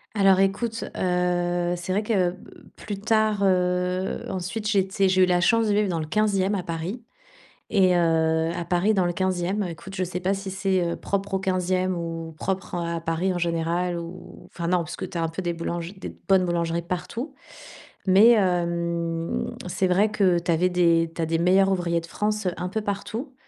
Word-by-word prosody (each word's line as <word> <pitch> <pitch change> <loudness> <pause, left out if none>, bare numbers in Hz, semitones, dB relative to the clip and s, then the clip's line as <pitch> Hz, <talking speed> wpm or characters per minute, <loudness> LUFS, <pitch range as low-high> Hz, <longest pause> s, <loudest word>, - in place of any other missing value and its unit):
Alors 195 -2 +5
écoute, 225 +4 0
heu, 175 -1 0
c'est 175 +1 -5
vrai 205 +3 +1
que 185 -5 +1 0.4
plus 205 -2 -6
tard, 215 -1 +2
heu, 180 0 0
ensuite, 190 +4 -3
j'étais 195 -1 +2
j'ai 185 0 +4
eu - - +7
la 180 -1 +2
chance 230 +5 +3
de 205 - +2
vivre 205 -1 +2
dans 165 -2 -1
le 155 - -3
15e 200 +1 +1
à 190 - 0
Paris 175 +7 -5 0.7
et 185 -2 +4
heu, 160 -1 +2
à 175 - -3
Paris 180 +5 +2
dans 185 -2 +2
le 175 - 0
15e, 185 +2 -1
écoute, 180 +2 -8
je 185 - 0
sais 180 +1 -4
pas 190 +2 +1
si 195 -1 -5
c'est, 190 -1 +1
heu, - - -2
propre 200 0 -3
au - - +2
15e 185 -1 0
ou 165 -1 -5
propre, 190 -1 -3
heu, 170 -1 -2
à 165 - -3
Paris 165 +3 -1
en - - -2
général, 170 +1 -1
ou 170 +2 -10
enfin, 170 -1 -3
non, 180 - +3
parce 170 -1 -4
que - - -5
tu 175 - -6
as 165 - 0
un - - 0
peu 165 +3 -5
des 170 -1 -1
boulangers 170 +2 -4
des 190 - -8
bonnes 190 -2 +5
boulangeries 170 -1 -1
partout. 185 - -5 0.7
Mais 205 +6 +7
hem, 170 -3 0 0.2
c'est 185 +1 0
vrai 200 +4 +3
que 190 -4 +3
tu 170 0 -1
avais 180 +3 +2
des 170 -2 +3
tu - - -12
as 165 - +1
des 165 +1 0
Meilleurs 190 +3 +4
ouvriers 170 -2 0
de 165 - -9
France 210 +2 -2
un 180 0 -3
peu 220 +3 -2
partout. 220 +6 -4
180 Hz, 200 wpm, -25 LUFS, 170-195 Hz, 0.7 s, eu